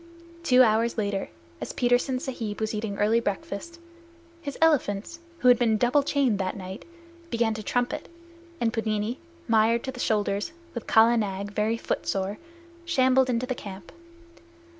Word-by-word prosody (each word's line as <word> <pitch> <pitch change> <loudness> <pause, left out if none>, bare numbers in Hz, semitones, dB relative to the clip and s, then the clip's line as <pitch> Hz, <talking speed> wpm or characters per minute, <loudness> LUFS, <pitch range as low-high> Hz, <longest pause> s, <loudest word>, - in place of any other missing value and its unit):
Two 255 -6 +6
hours 230 +1 +2
later, 200 -2 -1 0.3
as - - -5
Petersen 245 +1 +1
Sahib 240 -7 -5
was 220 0 -1
eating 210 -2 -3
early 215 +3 +3
breakfast, 205 - -4 0.6
his 280 -3 -6
elephants, 300 -2 +1 0.2
who 255 - +1
had 245 -2 +7
been 225 -3 +3
double 245 +6 +3
chained 275 -7 +1
that 185 0 -2
night, 190 +1 -8 0.4
began 230 -3 +1
to 215 - -5
trumpet, 245 +3 -2 0.5
and 230 -2 +1
Pudmini, 220 +2 -1 0.3
mired 225 +1 +3
to 265 - -3
the 250 - -11
shoulders, 210 +4 0 0.2
with 235 - -6
Kala 230 +2 +5
Nag, 200 -2 -2
very 215 +2 0
footsore, 195 -2 -2 0.4
shambled 260 -6 +3
into 245 0 0
the 255 - -2
camp. 195 -6 -9
230 Hz, 150 wpm, -26 LUFS, 210-250 Hz, 0.6 s, had